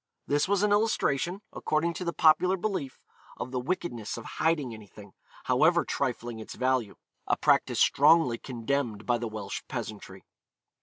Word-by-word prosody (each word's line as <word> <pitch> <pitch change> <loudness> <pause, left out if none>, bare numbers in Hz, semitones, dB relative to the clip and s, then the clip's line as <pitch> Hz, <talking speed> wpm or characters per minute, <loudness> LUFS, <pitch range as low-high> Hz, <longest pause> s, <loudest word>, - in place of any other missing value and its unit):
This 145 +3 +1
was 200 0 +1
an 210 - +2
illustration, 205 -4 +1
according 160 +2 0
to 180 - -5
the 170 - -1
popular 170 +4 +4
belief, 185 -9 -3 0.4
of 125 - -5
the 130 - -1
wickedness 125 - -3
of 115 - -8 0.2
hiding 155 -7 +1
anything, 105 -2 -13 0.3
however - - +3
trifling 120 -1 -3
its 110 - -8
value 130 -5 0 0.3
a - - +2
practice - - +2
strongly 135 -9 +4
condemned 120 -3 -3
by 120 -1 +1
the 120 - -3
Welsh 105 -2 -5
peasantry. 95 -3 -7
130 Hz, 150 wpm, -28 LUFS, 115-170 Hz, 0.4 s, popular